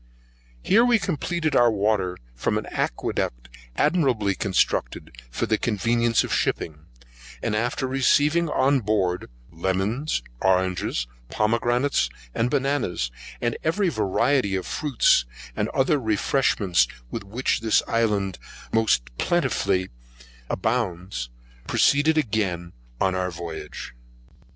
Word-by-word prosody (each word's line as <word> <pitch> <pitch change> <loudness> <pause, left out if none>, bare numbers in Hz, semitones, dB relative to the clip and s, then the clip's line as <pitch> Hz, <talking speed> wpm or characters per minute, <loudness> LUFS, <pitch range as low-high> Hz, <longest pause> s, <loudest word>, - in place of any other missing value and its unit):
Here 225 +4 +5
we 245 -1 +4
completed 170 -4 -1
our 120 -1 +6
water 100 -4 0 0.2
from - - -1
an - - -3
acqueduct - - -2 0.3
admirably 130 - +2
constructed 95 0 0 0.2
for 60 - -2
the 110 -1 +1
convenience 115 +2 +1
of - - -5
the - - +2
shipping, 80 -1 -2 0.6
and 110 -2 0
after 120 +4 -1
receiving 145 +5 +2
on 135 -1 +3
board 100 - 0 0.2
lemons, 95 - -1 0.2
oranges, 90 -9 +1 0.2
pomegranates, 120 - +1 0.2
and 115 +2 0
bananas, 135 - 0 0.3
with 120 -1 0
every 185 +4 +1
variety 110 - +1
of 95 - -2
fruits 140 - +2 0.3
and - - -1
other 135 +2 +2
refreshments 110 -4 +2 0.2
with - - -4
which 115 +7 -1
this 110 -1 +2
island 105 -5 0 0.3
most 110 - +3 0.2
plentifully 100 - +1 0.6
abounds, 90 - -2 0.4
proceeded 150 +3 +3
again 100 - -1 0.3
on 95 - +2
our 90 0 -1
voyage. 85 -2 -7
110 Hz, 110 wpm, -24 LUFS, 95-135 Hz, 0.6 s, our